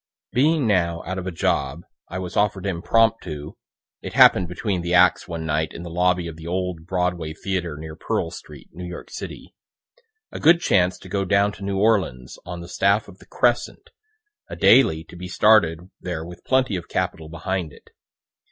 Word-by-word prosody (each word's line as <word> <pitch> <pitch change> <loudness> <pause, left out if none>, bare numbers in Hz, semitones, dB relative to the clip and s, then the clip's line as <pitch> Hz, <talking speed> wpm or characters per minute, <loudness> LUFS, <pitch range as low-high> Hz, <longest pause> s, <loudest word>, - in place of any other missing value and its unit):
Being 150 +2 +2
now 85 -5 +1
out 95 +2 -3
of 95 - -6
a - - -2
job, 70 -1 -1 0.3
I 90 - -5
was 90 -2 -6
offer'd 100 -2 +1
impromptu, 95 -4 0 0.5
(it - - -7
happen'd 90 - +6
between 90 +1 -2
the 85 +1 0
acts 90 +1 +4
one 85 -2 -5
night 80 0 -1
in 85 - -8
the 85 - -7
lobby 90 0 +1
of 80 -1 -7
the 80 0 -9
old 90 -2 -3
Broadway 90 -3 -1
theatre 90 -4 -3
near 80 0 -8
Pearl - - -2
street, - - -12
New 90 +3 -9
York 90 - -9
city,) - - -8 0.8
a - - -6
good 165 +3 +6
chance 90 - +2
to - - -13
go 100 +1 -1
down 100 +1 +2
to 100 - -11
New 100 0 -2
Orleans 95 - 0
on 90 -1 -6
the 85 - -9
staff 100 +4 +1
of 100 -1 -14
the - - -18
"Crescent," 120 -1 0 0.6
a - - -6
daily 80 -12 +5
to 85 - -15
be 90 +1 -7
started 90 -4 +3
there 85 -3 -5
with 90 +1 -11
plenty 130 -5 +2
of 85 - -8
capital 80 -1 -2
behind 85 0 -3
it. - - -19
90 Hz, 190 wpm, -23 LUFS, 85-100 Hz, 0.8 s, happen'd